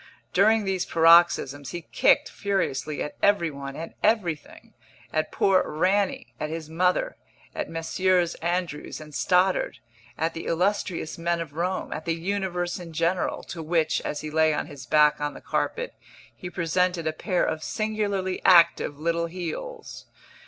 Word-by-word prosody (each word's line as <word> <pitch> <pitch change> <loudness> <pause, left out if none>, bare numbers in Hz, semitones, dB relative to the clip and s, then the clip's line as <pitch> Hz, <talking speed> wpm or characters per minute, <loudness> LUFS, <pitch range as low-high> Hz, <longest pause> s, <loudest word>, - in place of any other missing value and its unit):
During 215 +3 +4
these 190 -2 0
paroxysms 165 -5 +4
he 175 +3 -6
kicked - - +3
furiously 155 -7 -2
at 150 - -6
every 200 -6 +3
one 140 -1 -7
and 165 - -7
everything 190 -8 -1 0.4
at 155 0 0
poor 190 -1 +3
"Rannie," 185 +5 0
at 150 - -3
his 160 -1 -6
mother, 180 - +1 0.4
at - - -4
Messrs. 175 +2 +1
Andrews 170 -3 -2
and 155 -1 -11
Stoddard, 185 +4 +2 0.4
at 165 +1 -1
the 165 - -6
illustrious 180 -2 -1
men 170 0 0
of 160 -4 -6
Rome, 180 +4 -2
at 155 - -6
the 165 - 0
universe 180 0 -2
in 170 -2 -9
general, 170 +3 0
to 170 - -7
which, 160 0 +1
as 150 - -4
he 155 - -6
lay 160 0 +3
on - - -2
his 135 -3 -11
back 150 +2 +4
on 145 0 -2
the - - -8
carpet, - - -2 0.4
he 180 - -7
presented 175 0 0
a 155 - 0
pair 180 +3 0
of 160 0 -2
singularly 205 -4 -2
active 170 -5 +5
little 170 +2 0
heels. 185 - -7
170 Hz, 155 wpm, -25 LUFS, 155-185 Hz, 0.4 s, active